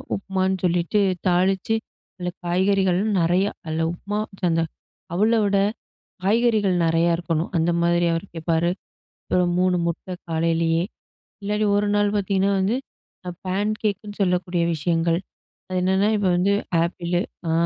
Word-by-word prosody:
உப்புமான்னு 190 Hz, -1 st, -1 dB
சொல்லிட்டு 175 Hz, +4 st, +1 dB, 0.3 s
தாளிச்சு, 190 Hz, +4 st, +2 dB, 0.4 s
அதுல 180 Hz, -1 st, -3 dB, 0.2 s
காய்கறிகள் 185 Hz, +1 st, +2 dB, 0.2 s
நிறைய. 175 Hz, +3 st, +3 dB, 0.2 s
அது 160 Hz, +1 st, -1 dB
உப்புமா, 205 Hz, +4 st, -4 dB, 0.3 s
அந்த 165 Hz, 0 st, +2 dB, 0.5 s
அவலோட 210 Hz, 0 st, +3 dB, 0.7 s
காய்கறிகள் 215 Hz, -3 st, +3 dB
நறைய 165 Hz, +1 st, +3 dB
இருக்கணும், 165 Hz, -1 st, -2 dB
அந்த 165 Hz, +2 st, +2 dB
மாரி 175 Hz, 0 st, +3 dB
அவர் 165 Hz, +4 st, -3 dB
கேப்பாரு. 165 Hz, +1 st, 0 dB, 0.6 s
அப்புறம் 180 Hz, -1 st, +1 dB
3 185 Hz, -1 st, +3 dB
முட்ட 170 Hz, +2 st, -4 dB, 0.2 s
காலையிலயே, 165 Hz, +1 st, +1 dB, 0.6 s
இல்லாட்டி 210 Hz, +1 st, 0 dB
1 205 Hz, -, +1 dB
நாள் 205 Hz, 0 st, +2 dB
பார்த்தீங்கன்னா 195 Hz, -1 st, +1 dB
வந்து, 195 Hz, +5 st, +1 dB, 0.7 s
பேன்கேக்னு 205 Hz, +1 st, -2 dB
சொல்லக்கூடிய 180 Hz, -2 st, +1 dB
விஷயங்கள். 165 Hz, +1 st, +1 dB, 0.5 s
அது 185 Hz, 0 st, -1 dB
என்னன்னா, 190 Hz, +3 st, +2 dB
இப்ப 205 Hz, -, 0 dB
வந்து 195 Hz, +3 st, +2 dB, 0.3 s
ஆப்பிளு 175 Hz, 0 st, -1 dB, 0.3 s
ஆ, -, -, +1 dB
185 Hz, 120 wpm, -23 LUFS, 170-200 Hz, 0.7 s, நிறைய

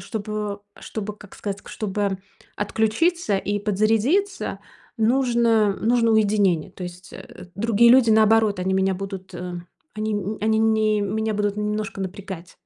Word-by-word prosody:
чтобы 210 Hz, -1 st, -4 dB, 0.2 s
чтобы, 210 Hz, -1 st, -6 dB
как 205 Hz, -2 st, -14 dB
сказать, 200 Hz, -1 st, -5 dB
чтобы 205 Hz, -2 st, -2 dB, 0.4 s
отключиться 220 Hz, -, +1 dB
и 205 Hz, +1 st, -2 dB
подзарядиться, 225 Hz, -, 0 dB, 0.4 s
нужно 230 Hz, -3 st, +3 dB
нужно 230 Hz, 0 st, +2 dB
уединение. 205 Hz, -6 st, +2 dB
То 185 Hz, -, -10 dB
есть, 180 Hz, +1 st, -9 dB
э, 180 Hz, -, -11 dB
другие 230 Hz, +3 st, +4 dB
люди, 250 Hz, -2 st, +6 dB
наоборот, 220 Hz, -2 st, +4 dB
они 190 Hz, +1 st, 0 dB
меня 190 Hz, 0 st, +2 dB
будут, 190 Hz, 0 st, -7 dB
э 180 Hz, 0 st, -5 dB, 0.4 s
они, 215 Hz, 0 st, -2 dB
м, 205 Hz, +1 st, -3 dB
они 220 Hz, +1 st, +2 dB
не 220 Hz, -1 st, +2 dB
меня 220 Hz, +2 st, -1 dB
будут 205 Hz, 0 st, -1 dB
немножко 210 Hz, -1 st, -3 dB
напрягать. 185 Hz, -2 st, -7 dB
210 Hz, 140 wpm, -23 LUFS, 195-220 Hz, 0.4 s, люди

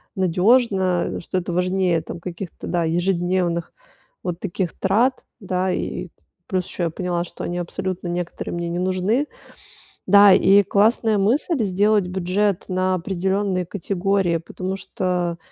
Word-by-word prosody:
надежно, 190 Hz, 0 st, +2 dB
что 185 Hz, -, -3 dB
это 175 Hz, -1 st, -3 dB
важнее 180 Hz, -1 st, +1 dB
там 170 Hz, -, -8 dB
каких-то, 175 Hz, +1 st, -7 dB
да, 170 Hz, -2 st, 0 dB
ежедневных 175 Hz, 0 st, 0 dB, 0.5 s
вот 175 Hz, -1 st, -3 dB
таких 185 Hz, -2 st, -3 dB
трат. 235 Hz, +7 st, +1 dB, 0.2 s
Да, 185 Hz, -2 st, -1 dB
и -, -, -3 dB, 0.4 s
плюс 185 Hz, -2 st, -1 dB
еще 175 Hz, -, -4 dB
я 170 Hz, -, +1 dB
поняла, 175 Hz, +1 st, -2 dB
что -, -, -9 dB
они 175 Hz, 0 st, -3 dB
абсолютно 180 Hz, +1 st, -4 dB
некоторые 175 Hz, 0 st, -4 dB
мне 170 Hz, 0 st, -3 dB
не 175 Hz, -, -2 dB
нужны. 185 Hz, +9 st, 0 dB, 0.8 s
Да, 200 Hz, 0 st, +8 dB
и 200 Hz, +2 st, +6 dB
классная 215 Hz, +2 st, +2 dB
мысль- 250 Hz, -, +1 dB
сделать 200 Hz, 0 st, +2 dB
бюджет 190 Hz, +2 st, 0 dB
на 185 Hz, 0 st, +1 dB
определенные 190 Hz, +1 st, -1 dB
категории, 195 Hz, -1 st, 0 dB
потому 185 Hz, +3 st, -5 dB
что, 180 Hz, -3 st, -2 dB
185 Hz, 135 wpm, -22 LUFS, 175-200 Hz, 0.8 s, Да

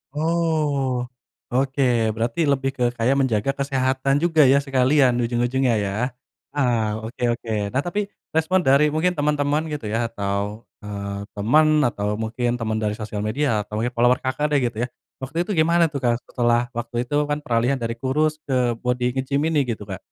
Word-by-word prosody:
Oh, 150 Hz, -6 st, 0 dB, 0.4 s
oke. 135 Hz, +2 st, 0 dB, 0.3 s
Berarti 115 Hz, +6 st, -2 dB
lebih 135 Hz, -1 st, +1 dB
ke 125 Hz, -, 0 dB
kayak 125 Hz, +4 st, +2 dB
menjaga 115 Hz, -1 st, 0 dB
kesehatan 135 Hz, 0 st, +1 dB
juga, 165 Hz, -2 st, +4 dB
ya, 140 Hz, +1 st, +4 dB
sekalian 135 Hz, -1 st, +3 dB
ujung-ujungnya, 120 Hz, +2 st, +1 dB
ya. 95 Hz, -, -2 dB, 0.6 s
Oh, 110 Hz, -5 st, 0 dB
oke 125 Hz, -, -8 dB
oke. 115 Hz, -1 st, -7 dB, 0.2 s
Nah, 130 Hz, -, +2 dB
tapi 205 Hz, +5 st, -2 dB, 0.2 s
respon 160 Hz, +4 st, +1 dB
dari 145 Hz, 0 st, +4 dB
mungkin 170 Hz, +2 st, +1 dB
teman-teman, 145 Hz, +1 st, +1 dB
gitu, 130 Hz, -8 st, -4 dB
ya, 115 Hz, +2 st, 0 dB
atau, 105 Hz, 0 st, -3 dB, 0.2 s
eee, 100 Hz, 0 st, -5 dB
teman 150 Hz, +9 st, +3 dB
atau 105 Hz, -2 st, -2 dB
mungkin 120 Hz, +3 st, -2 dB
teman 110 Hz, -1 st, -1 dB
dari 105 Hz, -1 st, -1 dB
sosial 105 Hz, -1 st, -5 dB
media 110 Hz, -2 st, 0 dB
atau 105 Hz, -, -16 dB
mungkin 120 Hz, -, 0 dB
follower 120 Hz, +2 st, +3 dB
Kakak, 150 Hz, +3 st, -1 dB
deh, 145 Hz, -, +4 dB
gitu, 115 Hz, -, -15 dB
ya. -, -, -7 dB, 0.3 s
Waktu 140 Hz, +6 st, -3 dB
itu 175 Hz, -, -3 dB
gimana 170 Hz, +1 st, +4 dB
tuh, 145 Hz, -, -4 dB
Kak, 120 Hz, -3 st, 0 dB
setelah 120 Hz, 0 st, +1 dB
waktu 120 Hz, 0 st, -5 dB
itu, -, -, -1 dB
kan, 145 Hz, 0 st, -2 dB
peralihan 125 Hz, -1 st, 0 dB
dari 115 Hz, 0 st, -3 dB
kurus 150 Hz, +5 st, 0 dB
ke 125 Hz, -3 st, +1 dB
bodi 125 Hz, +1 st, 0 dB
nge-gym 140 Hz, +2 st, 0 dB
ini 150 Hz, -4 st, +2 dB
gitu, 115 Hz, -4 st, -4 dB
Kak? 95 Hz, -, -4 dB
130 Hz, 175 wpm, -22 LUFS, 115-145 Hz, 0.6 s, juga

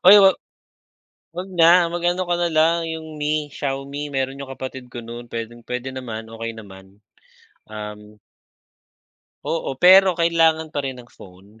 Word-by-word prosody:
Oy, 200 Hz, +3 st, +11 dB
wag 190 Hz, -1 st, +6 dB, 1.0 s
wag 185 Hz, +2 st, -5 dB
na. 170 Hz, 0 st, +5 dB
Mag 175 Hz, 0 st, -4 dB
ano 180 Hz, +1 st, 0 dB
ka 175 Hz, -, +2 dB
na 175 Hz, -, +2 dB
lang, 160 Hz, +1 st, +3 dB
yung 160 Hz, -1 st, -7 dB
Mi, 150 Hz, 0 st, -1 dB
Xiaomi, 140 Hz, +1 st, -4 dB
meron 135 Hz, -1 st, -3 dB
yung 140 Hz, -, -7 dB
kapatid 130 Hz, -1 st, -7 dB
ko 120 Hz, -1 st, -8 dB
nun, 120 Hz, +1 st, -9 dB
pwedeng-pwede 120 Hz, +3 st, -6 dB
naman, 115 Hz, -4 st, -7 dB
okey 115 Hz, 0 st, -5 dB
naman. 95 Hz, -2 st, -14 dB, 0.7 s
Um. 105 Hz, 0 st, -9 dB, 1.3 s
Oo. 150 Hz, -5 st, -3 dB
Pero 185 Hz, +3 st, +7 dB
kailangan 165 Hz, -2 st, +2 dB
pa 145 Hz, -, -1 dB
rin 135 Hz, -2 st, -5 dB
ng 120 Hz, -, -24 dB
phone. 100 Hz, +4 st, -17 dB
135 Hz, 150 wpm, -22 LUFS, 115-165 Hz, 1.3 s, Oy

